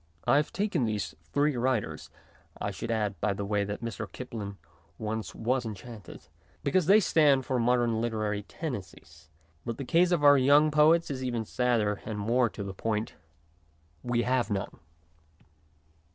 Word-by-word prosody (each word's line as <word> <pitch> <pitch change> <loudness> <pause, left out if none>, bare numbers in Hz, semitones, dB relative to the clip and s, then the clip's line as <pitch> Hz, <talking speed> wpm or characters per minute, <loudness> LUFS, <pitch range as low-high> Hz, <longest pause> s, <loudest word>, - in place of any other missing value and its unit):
I - - +4
have 150 - 0
taken 195 -8 0
these 105 -7 -2 0.2
three 145 0 +2
writers 125 -2 -1 0.5
(I - - -2
should - - -6
add, 105 -3 -1
by 105 - +1
the 100 +1 -4
way, 100 0 0
that 105 +3 -5
Mr. 115 -1 -5
Kipling 105 -6 -7 0.4
once 110 0 -4
was 125 +3 0
enchanted), 110 -2 -9 0.4
because 165 +3 +1
they 205 +3 +7
stand 145 -8 +3
for 130 -1 0
modern 120 -1 +2
literary 110 -3 -1
tendencies; 80 -4 -8 0.3
but 115 - -4
the 135 - -5
case 175 +5 +3
of 170 -4 +1
our 145 -1 +7
young 145 +4 +5
poets 155 +2 +4
is 130 -1 -4
even 120 -3 -2
sadder 115 -4 0
and 110 -2 -5
more 120 +4 +2
to 100 - -7
the 100 -1 -6
point. 110 +2 -2 0.9
We 120 -1 0
have 125 0 +1
none. 100 -2 -3
120 Hz, 160 wpm, -29 LUFS, 105-135 Hz, 0.9 s, they